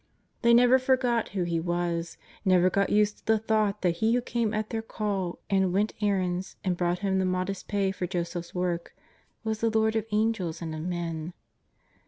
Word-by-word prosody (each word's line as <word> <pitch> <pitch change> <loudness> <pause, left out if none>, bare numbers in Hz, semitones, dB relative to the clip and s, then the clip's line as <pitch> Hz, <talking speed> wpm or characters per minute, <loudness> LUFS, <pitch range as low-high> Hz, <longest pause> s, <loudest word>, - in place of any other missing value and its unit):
They 235 -1 +6
never 250 +2 +6
forgot 255 -3 +1
who 190 -3 -1
He 170 -1 0
was; 170 0 -2 0.3
never 185 -2 +4
got 200 +1 +1
used 210 0 +2
to - - -32
the 220 0 +4
thought 215 -2 0
that 170 -2 +2
He 225 +2 +2
who 245 - +2
came 235 -3 -1
at 215 0 -2
their 225 - -1
call, 200 -5 -3
and 190 -2 +2
went 205 +3 +1
errands, 190 -3 0
and 185 -2 0
brought 175 0 0
home 190 -1 +2
the - - +2
modest 185 +1 -2
pay 200 -2 +1
for 185 -2 -3
Joseph's 175 0 -4
work, 175 -1 -2 0.5
was 220 -1 -2
the 230 - +3
Lord 220 0 +2
of 220 -1 -1
Angels 210 -6 0
and 165 -2 -5
of 155 - -5
men. 170 -1 -3
195 Hz, 195 wpm, -28 LUFS, 175-220 Hz, 0.5 s, They